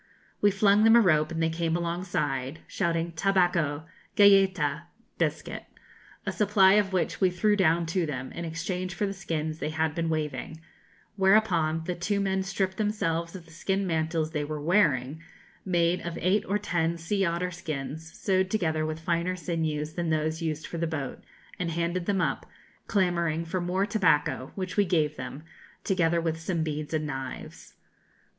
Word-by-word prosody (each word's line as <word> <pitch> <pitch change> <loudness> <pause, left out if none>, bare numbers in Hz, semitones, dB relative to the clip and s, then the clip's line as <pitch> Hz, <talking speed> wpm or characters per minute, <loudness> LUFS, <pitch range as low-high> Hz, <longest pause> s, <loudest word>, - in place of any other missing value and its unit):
We 205 - +6
flung 200 +1 +4
them 225 +1 +7
a - - +8
rope, 155 -7 +3
and 165 0 -1
they 165 - +1
came 165 0 0
alongside, 170 -5 -2
shouting 170 -2 -1
'Tabáco, 170 -4 +1 0.3
galléta' 190 -7 +4 0.3
(biscuit), - - -2 0.6
a - - -1
supply 200 -2 +4
of 205 -2 +3
which 185 +1 -1
we 190 - +5
threw 205 +4 +2
down 170 -3 +3
to 165 +1 0
them, 130 -3 -5
in 170 - -6
exchange 175 +2 -3
for 210 - 0
the 195 - -2
skins 160 -4 -3
they - - -2
had 160 -1 0
been 165 0 -1
waving; 155 -1 -3 0.6
whereupon 190 -5 +3
the 180 - -2
two 190 +4 -1
men 190 -1 0
stripped 190 0 -2
themselves 170 -6 -1
of 180 -3 -9
the 165 - -18
skin 195 +4 -1
mantles 160 -2 -1
they 150 -2 -1
were 150 +1 -4
wearing, 150 -4 +2 0.4
made 175 -1 +2
of 170 -1 -5
eight 190 +4 +2
or 205 - +1
ten 170 -4 -1
sea 195 +4 -1
otter 175 +1 -1
skins 160 -2 -6
sewed 190 -1 +1
together 160 -7 0
with 155 0 -4
finer 170 +2 0
sinews 155 -3 -2
than 170 -1 -2
those 155 +1 0
used 155 -2 -2
for 170 - -6
the 170 - 0
boat, 145 -5 -5 0.4
and 180 -2 -1
handed 170 +2 -2
them 195 -2 +1
up, - - -1 0.4
clamouring 170 -5 +1
for 180 +2 -2
more 185 +3 0
tobacco, 175 - +1
which 185 0 -4
we 205 - +6
gave 160 -5 +1
them, 150 0 -7 0.4
together 170 -3 +2
with 165 -1 -2
some 165 0 -1
beads 150 -1 -4
and 155 -1 -1
knives. 135 -3 -7
170 Hz, 170 wpm, -27 LUFS, 160-190 Hz, 0.6 s, a